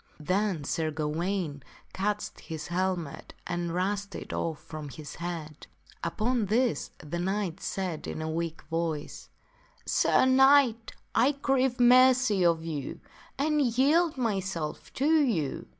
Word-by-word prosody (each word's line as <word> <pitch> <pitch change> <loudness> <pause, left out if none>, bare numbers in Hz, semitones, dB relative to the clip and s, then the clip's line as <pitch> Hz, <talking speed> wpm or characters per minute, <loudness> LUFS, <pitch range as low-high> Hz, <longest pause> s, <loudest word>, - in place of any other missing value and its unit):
Then 185 +1 0
Sir 160 +2 -1
Gawaine 155 +1 -2 0.3
catched 210 +2 -2
his 160 -2 -7
helmet 175 -4 -2
and 175 -1 -2
rushed 200 +3 -2
it - - -7
off 160 -2 -2
from 155 -2 -8
his 145 0 -9
head. 165 -3 -6 0.4
Upon 215 +6 0
this 220 - +1
the 150 +3 -5
knight 190 -1 -2
said 185 -5 -3
in - - -4
a 155 - -3
weak 165 0 -3
voice, 165 -2 -4 0.3
" - - -32 0.2
Sir - - +3
Knight, 260 -3 +5 0.2
I 265 +5 +4
crave 265 -2 +1
mercy 250 -4 +5
of 165 -1 +2
you, 150 -5 -4 0.4
and 300 +2 +2
yield 285 +6 +3
myself 190 -9 -2
to 305 +4 +3
you." 175 - -1
185 Hz, 135 wpm, -28 LUFS, 160-245 Hz, 0.4 s, Knight